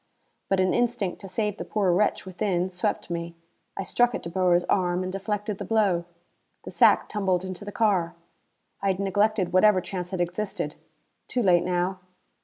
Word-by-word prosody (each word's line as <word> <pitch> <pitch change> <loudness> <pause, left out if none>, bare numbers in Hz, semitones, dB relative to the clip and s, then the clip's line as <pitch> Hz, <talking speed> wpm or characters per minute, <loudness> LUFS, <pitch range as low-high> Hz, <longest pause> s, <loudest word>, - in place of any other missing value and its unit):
But 195 - +2
an 185 0 +2
instinct 230 -6 0
to 195 - -8
save 210 +1 -2
the - - -4
poor 200 -4 +1
wretch 200 +3 +1
within 185 -1 -1
swept 180 -1 -2
me. 170 0 -4 0.4
I - - -2
struck 245 +4 +2
at - - -5
De 170 - -5
Boer's 180 -1 +3
arm 180 -1 +1
and 185 - -4
deflected 205 +1 -3
the - - -3
blow. 195 -5 +1 0.6
The - - -8
sack - - +4
tumbled 190 -3 0
into 185 +1 -6
the 205 - -6
car. 190 -6 +1 0.7
I 200 - -1
had 190 -1 +1
neglected 200 -1 +1
whatever 190 +1 +5
chance 180 -1 -5
had 185 - -4
existed. 180 +4 -2 0.5
Too 245 - -1
late 175 -3 +4
now! 180 +1 -1
190 Hz, 180 wpm, -26 LUFS, 180-210 Hz, 0.7 s, whatever